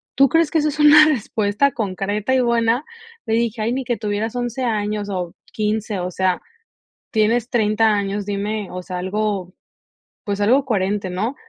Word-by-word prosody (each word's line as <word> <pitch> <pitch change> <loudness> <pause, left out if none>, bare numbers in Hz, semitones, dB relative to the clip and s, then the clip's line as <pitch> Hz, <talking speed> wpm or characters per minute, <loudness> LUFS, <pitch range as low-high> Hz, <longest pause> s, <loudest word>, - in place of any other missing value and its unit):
¿tú 275 -1 +5
crees 325 0 +3
que 330 - 0
eso 305 -1 +2
es 300 - -6
una 300 +1 +8
respuesta 220 -2 +1
concreta 205 +1 -2
y 260 - +3
buena? 235 +1 +2 0.4
Le 225 - +1
dije: 230 -1 -1
"Ay, 230 +3 0
ni 265 - -2
que 240 -2 -2
tuvieras 215 +2 -3
11 245 +1 -3
años 210 -3 -1
o 180 -2 -3 0.2
15 215 -2 -1
o 180 - -3
sea, 185 0 0 0.7
tienes 230 +2 +1
30 220 -1 +2
años, 200 0 -2
dime, 205 0 -3
o 180 - -5
sea, 180 0 -5
algo, 190 -1 -2 0.7
pues, 200 -1 -3
algo 255 +7 +4
coherente, 200 -5 -1
¿no?". 215 +9 -2
215 Hz, 170 wpm, -20 LUFS, 200-240 Hz, 0.7 s, una